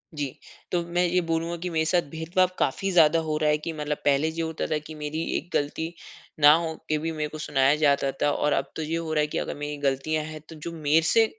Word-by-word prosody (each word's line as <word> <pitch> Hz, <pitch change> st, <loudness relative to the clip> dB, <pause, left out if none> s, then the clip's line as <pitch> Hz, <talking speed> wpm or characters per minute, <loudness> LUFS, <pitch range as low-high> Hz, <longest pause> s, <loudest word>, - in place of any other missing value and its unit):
जी, 145 Hz, -2 st, -1 dB, 0.4 s
तो 175 Hz, -1 st, +1 dB
मैं 175 Hz, +1 st, +1 dB
ये 180 Hz, +1 st, +2 dB
बोलूँगा 165 Hz, +1 st, -1 dB
कि -, -, -1 dB
मेरे 160 Hz, -2 st, 0 dB
साथ 175 Hz, +2 st, +3 dB
भेदभाव 170 Hz, +4 st, +1 dB
काफ़ी 195 Hz, +8 st, 0 dB
ज़्यादा 165 Hz, -2 st, +5 dB
हो 155 Hz, 0 st, 0 dB
रहा 155 Hz, -1 st, +2 dB
है 150 Hz, -, +3 dB
कि 160 Hz, +2 st, -5 dB
मतलब 150 Hz, -1 st, -3 dB
पहले 145 Hz, +2 st, +3 dB
ये 160 Hz, +1 st, -3 dB
होता 160 Hz, -1 st, -2 dB
था 155 Hz, -, 0 dB
कि 150 Hz, +1 st, -9 dB
मेरी 150 Hz, +1 st, -4 dB, 0.2 s
एक 175 Hz, -, -7 dB
गलती 160 Hz, +3 st, -1 dB, 0.5 s
ना 145 Hz, 0 st, +9 dB
होके 160 Hz, -1 st, -3 dB
भी 165 Hz, +2 st, -2 dB
मेरे 155 Hz, -1 st, -2 dB
को 155 Hz, -, -8 dB
सुनाया 145 Hz, -2 st, +2 dB
जाता 140 Hz, -2 st, +2 dB
था -, -, +4 dB
और 150 Hz, -, +1 dB
अब 135 Hz, -, -1 dB
तो 160 Hz, -, -3 dB
ये 160 Hz, +2 st, -2 dB
हो 165 Hz, -1 st, -3 dB
रहा 150 Hz, -, +3 dB
है 150 Hz, -, +1 dB
कि -, -, -4 dB
अगर -, -, -3 dB
मेरी 145 Hz, 0 st, -5 dB
गलतियाँ 145 Hz, +3 st, 0 dB
हैं, 155 Hz, 0 st, -7 dB
तो 160 Hz, -, -9 dB
जो 160 Hz, +2 st, -6 dB
मेरे 155 Hz, 0 st, +2 dB
से 225 Hz, -1 st, +5 dB
155 Hz, 255 wpm, -26 LUFS, 150-165 Hz, 0.5 s, ना